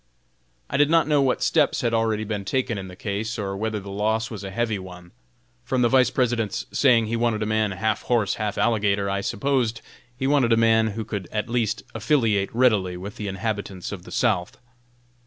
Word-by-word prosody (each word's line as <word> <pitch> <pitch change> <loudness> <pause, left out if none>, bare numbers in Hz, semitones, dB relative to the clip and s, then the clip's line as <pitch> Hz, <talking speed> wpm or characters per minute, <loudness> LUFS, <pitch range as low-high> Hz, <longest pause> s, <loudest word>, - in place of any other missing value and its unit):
I - - -1
did 145 +1 +4
not 165 -1 +4
know 150 -2 +3
what 130 -2 +1
steps 150 -4 +2
had 120 -2 0
already 110 -1 +1
been 105 -2 -3
taken 120 0 -1
in 95 - -7
the 90 - -10
case, 105 +4 -3
or 100 -2 -3
whether 110 +1 -2
the 100 0 -9
loss 110 +3 -1
was 105 -3 -6
a 95 - -5
heavy 110 0 -1
one. 90 -1 -11 0.5
From 125 0 0
the 120 - +4
Vice 130 -1 +4
President's 120 -5 -1
saying 120 -5 +4
he 115 +2 -2
wanted 115 -2 0
a - - -1
man 110 0 +1
"half 100 +3 -1
horse, 115 -5 +1
half 105 -1 -2
alligator," 100 -3 +1
I 100 0 -1
supposed 120 +1 0 0.4
he 130 - -2
wanted 135 -4 +3
a - - +3
man 110 -1 +4
who 110 - -3
could 100 -4 -5
at 105 +2 -2
least 115 -1 -1
affiliate 110 -9 +1
readily 105 -7 +2
with 100 +3 -8
the 105 - -4
inhabitants 100 -2 -4
of - - -6
the - - -13
South. 90 0 0
110 Hz, 205 wpm, -24 LUFS, 100-120 Hz, 0.5 s, did